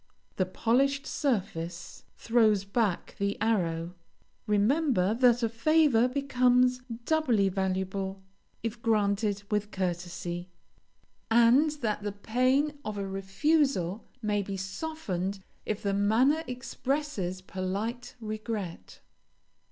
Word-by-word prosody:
The 185 - +1
polished 275 +8 +1
surface 190 - -3
throws 220 -4 +3
back 200 -1 -1
the 200 0 0
arrow. 175 -6 0 0.5
Remember 210 - +2
that 245 0 +4
a - - +4
favor 250 +1 +3
becomes 250 -2 +2 0.3
doubly 250 -11 +2
valuable 190 0 -2 0.4
if 230 0 -4
granted 205 -2 +1
with 210 0 0
courtesy, 175 -1 -3 0.8
and 235 +6 +5
that 210 -2 0
the 205 -1 -3
pain 255 +8 +1
of 215 -1 -4
a 200 -1 -3
refusal 195 - 0 0.2
may 205 -1 +1
be 195 0 -5
softened 195 - -3 0.3
if 215 -1 -2
the 200 -1 0
manner 235 +10 +3
expresses 250 -6 -3
polite 205 +7 -4
regret. 215 - -5
215 Hz, 105 wpm, -29 LUFS, 195-250 Hz, 0.8 s, and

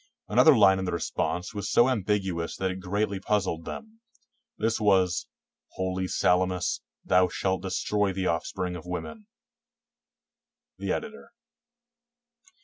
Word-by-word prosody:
Another 155 -5 +6
line 95 -3 +6
in 95 - -2
the 90 - -2
response 90 +3 -2
was 100 -1 -4
so 120 - +5
ambiguous 95 -7 -1
that 95 -1 -1
it 95 - -6
greatly 100 +2 -1
puzzled 95 -5 -1
them. 225 0 -8 0.6
This 110 +1 0
was, 95 -4 +2 0.5
"Holy 95 0 -2
Salamis, 90 0 +1 0.2
thou 90 0 +4
shalt 95 +1 -1
destroy 100 +2 0
the 95 0 -3
offspring 90 +2 -2
of 90 0 -9
women." 210 - -6 1.5
The - - -2
Editor. - - -5
95 Hz, 125 wpm, -27 LUFS, 90-105 Hz, 1.5 s, Another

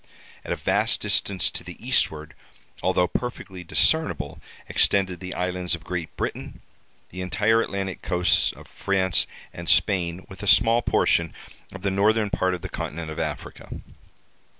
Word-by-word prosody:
At - - -6
a - - +1
vast - - +2
distance 95 -3 +2
to - - -5
the - - -9
eastward, 75 -1 0 0.5
although 90 - +2
perfectly 95 -7 -5
discernible, 160 - +1 0.3
extended 95 -3 +2
the 90 +1 -6
islands 90 -1 -1
of 85 - -13
Great 85 -3 -5
Britain, - - -4 0.5
the 90 - -6
entire 105 +5 +2
Atlantic 95 -3 -3
coasts 90 0 +2
of - - -14
France 95 -2 +1 0.3
and 85 0 -5
Spain, 90 -3 +2
with 95 0 -11
a 105 - -5
small 115 +4 +5
portion 85 -7 +2 0.4
of 95 0 -10
the 100 - +1
northern 105 +2 +2
part 95 0 +1
of 90 - -10
the - - -3
continent 80 0 -5
of 80 - -6
Africa. - - -5
95 Hz, 150 wpm, -25 LUFS, 90-100 Hz, 0.5 s, small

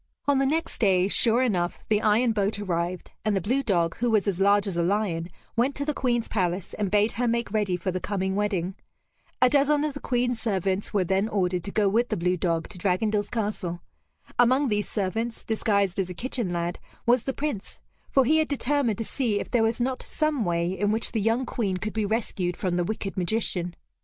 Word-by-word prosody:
On 280 -2 +4
the 270 - +2
next 325 +4 -1
day, 190 -4 +3
sure 230 +4 +4
enough, 175 -8 -1
the 210 -1 +2
iron 225 +3 +3
boat 205 -1 0
arrived, 180 -2 -3
and 215 -1 +1
the - - +2
blue 245 +10 0
dog, 175 -9 0
who 240 +1 +1
was 215 -2 +2
as 190 -3 0
large 200 +1 +4
as 195 -4 -2
a 170 - +1
lion, 175 -2 0 0.3
went 250 +4 +1
to 285 - -2
the 300 - 0
Queen's 240 -4 0
palace, 185 -3 -1
and 205 -2 -1
bade 210 +3 +3
her 245 +1 -1
make 235 -2 0
ready 205 -4 0
for 180 +2 -2
the 185 - -2
coming 190 -1 -2
wedding. 195 -3 -1 0.7
A - - +8
dozen 290 +2 +3
of 305 -2 -1
the 280 - -6
Queen's 245 -2 -1
servants 195 -3 -1
were 200 -3 +2
then 190 +4 +1
ordered 180 -4 0
to 200 - -3
go 210 -1 +2
with 230 +5 +2
the - - -1
blue 180 +1 +1
dog 165 -2 -1
to 180 - -8
Dragondel's 205 +3 0
castle. 205 -6 -3 0.6
Among 255 +3 +4
these 210 -1 0
servants, 225 +3 -2
disguised 200 -4 +1
as 185 -2 0
a 180 - -6
kitchen 240 -3 -2
lad, 175 0 -2 0.3
was 240 0 +3
the 270 - 0
Prince; 285 -9 -4 0.3
for 270 -2 +4
he 310 +6 +4
had 315 -1 +2
determined 280 -5 0
to 225 - -2
see 225 -6 0
if - - -6
there 240 - +3
was 225 +1 +1
not 255 +1 -1
some 305 -5 -1
way 170 -1 0
in 205 +2 0
which 220 +1 0
the 220 - -1
young 225 +5 +1
Queen 200 -8 -1
could 215 +3 -4
be 215 -2 0
rescued 195 -5 -1
from 180 -2 -1
the 175 - +1
wicked 195 +1 -4
magician. 180 -2 -1
210 Hz, 220 wpm, -26 LUFS, 185-240 Hz, 0.7 s, A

